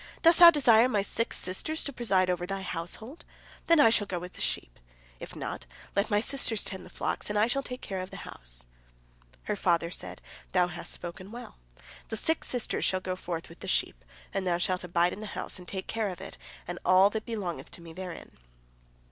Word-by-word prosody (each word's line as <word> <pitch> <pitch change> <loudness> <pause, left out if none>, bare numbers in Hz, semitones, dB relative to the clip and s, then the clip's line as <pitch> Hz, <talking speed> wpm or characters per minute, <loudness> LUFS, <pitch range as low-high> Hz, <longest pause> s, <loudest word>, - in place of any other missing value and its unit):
Dost 335 +1 +7
thou 345 -1 +13
desire 250 -6 +6
my 205 -5 +2
six 230 +3 0
sisters 250 - -1
to 280 - -3
preside 195 -7 +2
over 175 0 -2
thy 195 0 -3
household? 190 - -5 0.4
Then 335 - +6
shall 220 -2 +3
I - - -20
go 185 - -3
abroad - - -5
with 180 - -8
the - - -9
sheep. - - -2 0.4
If - - -8
not, - - -5 0.3
let 200 +3 +2
my 205 -2 +3
sisters 230 -2 0
tend 190 - -5
the - - -12
flocks, - - -2
and 210 - 0
I 210 - +5
shall 275 +4 0
take 250 -1 -7
care 190 -2 -4
of 185 0 -5
the - - -9
house." - - -10 0.8
Her 210 - -1
father 170 -3 +1
said: - - -6 0.3
"Thou 180 -1 +4
hast 175 0 -3
spoken 185 +3 -5
well. 240 - -9 0.5
Thy - - -2
six 320 +8 +1
sisters 245 -3 0
shall 185 - +2
go 185 0 -3
forth 170 -2 -5
with 165 - -14
the 195 - -8
sheep, - - 0 0.3
and 190 -1 -1
thou 175 -1 +2
shalt 180 +1 0
abide 175 0 +2
in - - -7
the 215 - -6
house - - -2
and 180 - -12
take 190 -1 -4
care 225 -2 -1
of 180 - -7
it, - - -9 0.3
and 175 0 -4
all 185 +2 +6
that 220 0 -3
belongeth 205 -8 -4
to - - -9
me 165 -1 -10
therein." 180 -1 -7
190 Hz, 220 wpm, -29 LUFS, 175-225 Hz, 0.8 s, thou